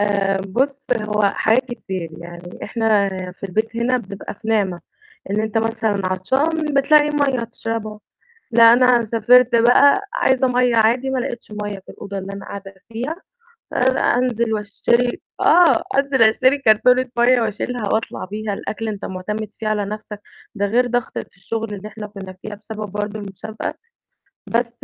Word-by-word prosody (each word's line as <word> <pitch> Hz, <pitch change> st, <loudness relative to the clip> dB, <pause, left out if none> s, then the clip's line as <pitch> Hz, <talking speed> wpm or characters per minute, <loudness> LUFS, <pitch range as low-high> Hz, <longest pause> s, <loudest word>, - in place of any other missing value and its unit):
آآ، 200 Hz, -1 st, +1 dB
بُص 270 Hz, +6 st, -1 dB
هو 210 Hz, 0 st, -1 dB
حاجات 220 Hz, +5 st, +2 dB
كتير 190 Hz, -9 st, -5 dB
يعني 175 Hz, +1 st, -10 dB
إحنا 220 Hz, -4 st, +2 dB, 0.2 s
في 195 Hz, -, -7 dB
البيت 220 Hz, +4 st, -2 dB
هنا 250 Hz, +2 st, +1 dB
بنبقى 200 Hz, -3 st, -8 dB
في 220 Hz, +2 st, -10 dB
نعمة، 195 Hz, -6 st, +1 dB, 0.5 s
إن 210 Hz, -, +1 dB
أنت 220 Hz, 0 st, -1 dB
مثلًا 220 Hz, -2 st, -1 dB
عطشان 280 Hz, -, 0 dB
بتلاقي 295 Hz, +2 st, +4 dB
مَيّة 275 Hz, -5 st, +1 dB
تشربها 220 Hz, -2 st, -5 dB, 0.5 s
لأ، 230 Hz, 0 st, +8 dB
أنا 245 Hz, -1 st, +4 dB
سافرت 240 Hz, +2 st, +4 dB
بقى 245 Hz, +7 st, +5 dB
عايزة 260 Hz, 0 st, +2 dB
مَيّة 250 Hz, -1 st, +2 dB
عادي 235 Hz, +4 st, +3 dB
ما 265 Hz, -1 st, 0 dB
لقيتش 240 Hz, -4 st, -5 dB
مَيّة 205 Hz, -1 st, -5 dB
في 190 Hz, -, -19 dB
الأوضة 200 Hz, 0 st, -7 dB
اللي 195 Hz, +1 st, -6 dB
أنا 195 Hz, -, -8 dB
قاعدة 200 Hz, -1 st, -8 dB, 0.2 s
فيها، 255 Hz, +8 st, -3 dB, 0.6 s
آآ، -, -, 0 dB, 0.4 s
أنزل 235 Hz, -3 st, 0 dB
واشتري 235 Hz, +4 st, 0 dB, 0.2 s
آه 350 Hz, -1 st, +5 dB
أنزل 275 Hz, -2 st, +2 dB
اشتري 255 Hz, +5 st, +4 dB
كرتونة 250 Hz, 0 st, +4 dB
مَيّة 245 Hz, +1 st, +4 dB
وأشيلها 225 Hz, +2 st, -3 dB
وأطلع 220 Hz, -3 st, -2 dB
بيها، 210 Hz, +1 st, -4 dB
الأكل 220 Hz, +3 st, -5 dB
أنت 210 Hz, -2 st, -4 dB
معتمد 210 Hz, +3 st, -4 dB
فيه 220 Hz, -, -5 dB
على 210 Hz, -1 st, 0 dB
نفسك 210 Hz, 0 st, -7 dB, 0.4 s
ده 205 Hz, -1 st, 0 dB
غير 240 Hz, +5 st, +2 dB
ضغطة 245 Hz, -1 st, -2 dB
الشغل 220 Hz, +3 st, -4 dB
اللي 205 Hz, +1 st, -7 dB
إحنا 215 Hz, 0 st, -8 dB
كنا 195 Hz, -2 st, -9 dB
فيها 210 Hz, +1 st, -7 dB
بسبب 215 Hz, -1 st, -7 dB
برضه 205 Hz, +1 st, -4 dB
المسابقة. 205 Hz, +2 st, -6 dB, 0.7 s
بس 235 Hz, 0 st, -2 dB
220 Hz, 155 wpm, -20 LUFS, 205-245 Hz, 0.7 s, لأ